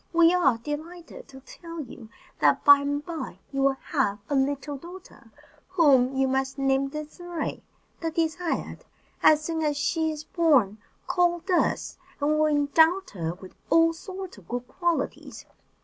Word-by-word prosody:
We 335 0 +5
are 275 -10 +3
delighted 315 +7 -8
to 270 -1 -13
tell 335 +5 -10
you 240 -4 -11 0.3
that - - +3
by 285 0 +9
and 285 +1 -3
by 310 - -6
you 275 -1 -2
will 270 0 +2 0.2
have 235 -9 +1
a - - +2
little 280 +1 -1
daughter, 350 +6 -13 0.4
whom 275 -8 +3
you 270 0 +2
must 265 +1 -1
name 270 0 +1
Désirée 310 +3 -6 0.4
the 330 - -2
Desired. 330 +1 -2 0.4
As 305 0 +5
soon 325 -1 -2
as 295 -2 0
she 320 +2 0
is 305 -1 -5
born, 280 - +2 0.3
call 345 -1 +1
us, 360 - 0 0.2
and 290 +1 +1
we - - +2
will 310 0 +3
endow 310 +5 +3
her 165 -3 -4
with 185 0 -13 0.2
all 330 0 +4
sorts 375 - -9
of 180 - -21
good 245 +1 -4
qualities. 340 -6 -3
300 Hz, 160 wpm, -26 LUFS, 270-335 Hz, 0.4 s, by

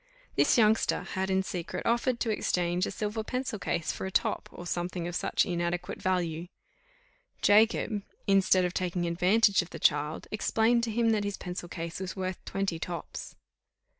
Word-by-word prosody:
This - - +4
youngster 220 -1 +3
had 190 0 -3
in 190 0 +2
secret 180 -3 -5
offered 235 +1 +1
to 225 - +1
exchange 180 -3 0
a - - -3
silver 215 +1 -3
pencil 250 -2 -3
case 170 -3 -1
for - - -5
a - - -6
top, 220 +2 0
or 175 - -9
something 175 0 -2
of 175 - -5
such - - +1
inadequate 175 0 -2
value: 175 -3 -1 1.0
Jacob, 210 0 +4 0.2
instead 190 -2 +4
of 180 - -2
taking 180 -1 -1
advantage 195 +5 +4
of 175 - -9
the - - -7
child, 150 +1 +1
explained 225 +2 +2
to 225 - -3
him 230 +1 +2
that 215 -2 +1
his 205 0 -3
pencil 180 -1 -6
case 170 0 -5
was 190 -1 -5
worth 185 -1 -4
twenty 195 -4 -2
tops. 170 -1 -6
185 Hz, 170 wpm, -29 LUFS, 175-215 Hz, 1.0 s, This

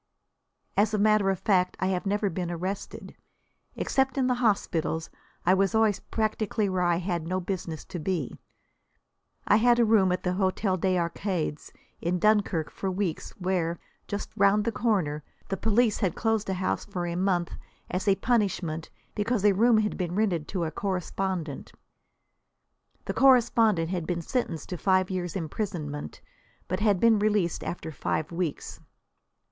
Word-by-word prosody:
As 215 +1 +3
a - - +1
matter 210 -1 +3
of 190 - +1
fact, 180 -1 +1
I - - 0
have 185 +1 -1
never 205 0 0
been 175 +1 -3
arrested. 185 +3 -5 0.6
Except 265 0 0
in 265 - +2
the 250 - +2
hospitals, 165 -7 0 0.3
I 180 - +5
was 195 +2 +2
always 220 -3 +3
practically 215 -1 -1
where 185 -1 -1
I 175 -1 +3
had 170 -2 -2
no 185 +2 0
business 175 -4 -4
to 175 - -6
be. 165 -4 -3 1.1
I 205 - +6
had 240 +2 +4
a 235 - +4
room 210 -4 +4
in 180 - +2
the 180 - 0
Hôtel 190 0 0
des 185 -1 +2
Arcades, 170 -2 -2 0.3
in 175 +2 0
Dunkirk, 200 -5 +2
for 195 - -3
weeks, 185 -3 -2
where, 180 -3 -1 0.3
just 205 0 -4
round 200 +1 +3
the 230 - +1
corner, 185 -12 0 0.3
the 195 - 0
police 225 +1 +2
had 190 -6 0
closed 225 -3 0
a 190 - 0
house 185 +1 -1
for 180 -4 -4
a 170 - -3
month 180 -2 0 0.4
as 185 +3 -2
a 195 - +5
punishment 190 -9 0 0.2
because 210 0 0
a 205 - +6
room 225 +4 +4
had 210 -1 0
been 180 -2 -2
rented 185 -7 0
to 185 -3 -2
a 160 - -2
correspondent. 185 -4 -3 1.3
The - - -2
correspondent 230 -9 +4
had 175 -4 -2
been 170 -2 -2
sentenced 165 - -2
to 180 - -4
five 185 0 +2
years' 175 -3 -3
imprisonment, 155 - -4 0.5
but 185 - -2
had 205 -3 +3
been 225 0 +5
released 205 -5 +1
after 165 -2 -5
five 155 +1 -2
weeks. 170 -3 -3
190 Hz, 165 wpm, -27 LUFS, 175-210 Hz, 1.3 s, I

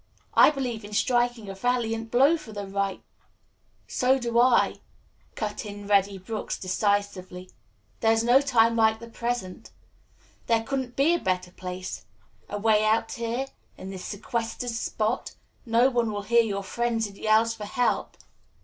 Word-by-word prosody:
I - - +8
believe 250 -6 -3
in 205 +1 -9
striking 240 0 +1
a 195 - -5
valiant 225 +1 -1
blow 275 +8 +5
for 280 -9 -9
the 205 -1 -5
right 195 0 -2 0.5
" - - -44 0.2
"So 260 +1 +2
do 235 -2 0
I," 250 +1 +4 0.6
cut 210 -2 -3
in 205 -1 -8
Reddy 200 -1 +2
Brooks 210 +4 -4
decisively. 185 -1 -2 0.5
"There 225 - +3
is 225 0 +2
no 245 +3 +5
time 230 -5 +3
like 220 -1 +3
the 235 - -11
present. 230 -4 -4 0.8
There 230 -1 +2
couldn't 260 0 -3
be 290 +5 +3
a 345 - +1
better 185 - -1
place. 185 +1 -7 0.4
Away 215 +1 +2
out 225 +1 +2
here 235 +2 -2 0.3
in 190 - -8
this 185 -1 -7
sequestered 230 +3 -3
spot 225 +1 -2 0.3
no 235 +3 +4
one 235 -3 +1
will 205 -1 -4
hear 235 +3 +4
your 200 -3 -2
frenzied 225 -1 -2
yells 220 +1 +3
for 210 -2 -7
help." 245 +4 -1
225 Hz, 155 wpm, -26 LUFS, 205-240 Hz, 0.8 s, I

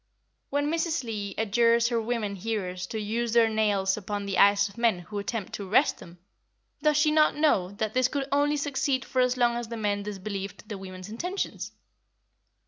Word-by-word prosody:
When 290 +1 0
Mrs. 330 -2 0
Leigh 210 -4 -4
adjures 230 +2 +3
her 235 -2 0
women 220 -3 -2
hearers 185 -3 -3
to 220 - -4
use 225 +2 -2
their 230 -1 +5
nails 205 -3 +1
upon 205 0 -4
the 195 -2 -1
eyes 200 0 +5
of 200 - -14
men 230 -4 +2
who 205 +4 -6
attempt 200 0 -4
to 200 -2 -5
arrest 265 +8 +3
them, 170 +1 -13 0.6
does 300 0 +3
she 300 0 +4
not 305 0 +4
know 290 - +2
that 215 +1 -3
this 255 0 +3
could 275 0 -3
only 290 +1 +2
succeed 275 -2 -1
for 255 - 0
as 250 0 +2
long 240 -1 +3
as 240 -1 -4
the 230 0 -6
men 205 -2 -1
disbelieved 200 0 -6
the 210 - -5
women's 185 -1 -9
intentions? 355 - -4
225 Hz, 190 wpm, -27 LUFS, 200-255 Hz, 0.6 s, their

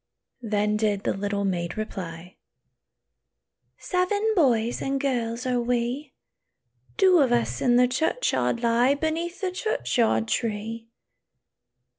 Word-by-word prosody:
Then 210 -2 0
did 210 -2 0
the - - 0
little 200 0 -2
maid 175 -1 -2
reply, 180 -5 -6 1.4
"Seven 405 +4 0
boys 240 - +2
and 275 0 -1
girls 245 -3 -2
are 250 -1 +1
we; 245 +4 -2 0.8
Two 375 -4 +5
of 270 -4 +3
us 240 -1 0
in 245 -2 +3
the 250 0 +5
churchyard 265 - 0
lie, 240 +4 +3
Beneath 325 +4 -3
the 375 -2 -1
churchyard 250 - 0
tree." 225 +1 -3
240 Hz, 115 wpm, -25 LUFS, 215-285 Hz, 1.4 s, Two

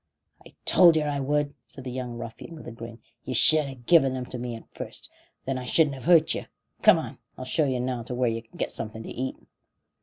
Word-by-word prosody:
"I - - -15
told 175 -3 +7
yer 155 -1 +1
I 145 -1 -1
would," 145 +1 0
said 135 - -11
the 125 - -5
young 125 -1 -5
ruffian, 115 +8 -8
with 155 - -11
a - - -6
grin. 115 0 -9 0.3
"You 130 - -4
should 155 +4 +5
ha' 130 -3 -10
given 135 -5 +5
'em 125 -1 -4
to 125 - -4
me 120 -1 -4
at 115 - -12
first, - - -8 0.3
and 135 - -1
then 130 - -3
I - - -7
shouldn't 150 +3 +3
have 130 - -9
hurt 165 -2 +5
yer. - - -5 0.3
Come - - +7
on; - - -6 0.2
I'll 130 - -6
show 150 +4 +1
yer 130 -1 0
now 125 -1 -2
where 125 0 0
yer 115 0 -1
can 115 - -19
get - - -1
something 110 0 -4
to - - -8
eat." 130 +1 -3
130 Hz, 245 wpm, -26 LUFS, 120-145 Hz, 0.3 s, told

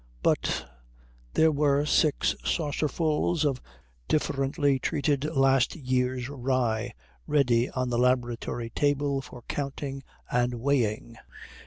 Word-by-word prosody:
But - - +1 0.7
there 160 0 +5
were 145 -1 +2
six 150 0 +2
saucerfuls 155 +1 0
of 135 -3 0 0.5
differently 140 -1 +1
treated 145 0 0
last 135 -4 +2
year's 130 -3 -1
rye 125 -4 -1 0.3
ready 125 -5 +2
on 130 -1 -2
the 120 - +1
laboratory 120 -2 0
table 145 0 +1
for 125 -2 -12
counting 140 0 -4 0.3
and 125 0 +1
weighing. 115 -3 -1
135 Hz, 105 wpm, -27 LUFS, 125-145 Hz, 0.7 s, there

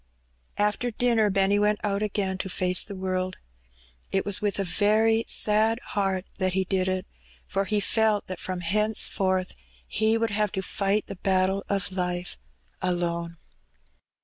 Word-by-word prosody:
After 210 +4 +1
dinner 230 -2 +2
Benny 195 +1 +3
went 210 0 +2
out 200 -1 0
again 195 -3 -1
to 190 - -3
face 180 0 +2
the 200 - -6
world. 185 0 -2 0.7
It 195 - 0
was 205 -1 +3
with 205 -1 0
a 200 - 0
very 220 +4 +2
sad 220 +2 +3
heart 195 -2 0
that 185 -1 +1
he 190 0 +1
did 190 0 0
it; 185 0 -1 0.4
for 195 0 -1
he 210 +2 0
felt 215 0 +2
that 185 - -6
from 185 -1 -3
henceforth 190 -1 +1 0.3
he 220 +1 +1
would 225 -1 0
have 210 -1 0
to 190 - -2
fight 200 +2 0
the 195 - -8
battle 190 +1 +1
of 195 -2 0
life 180 -1 -3 0.4
alone. 170 -2 -1
195 Hz, 155 wpm, -26 LUFS, 185-210 Hz, 0.7 s, Benny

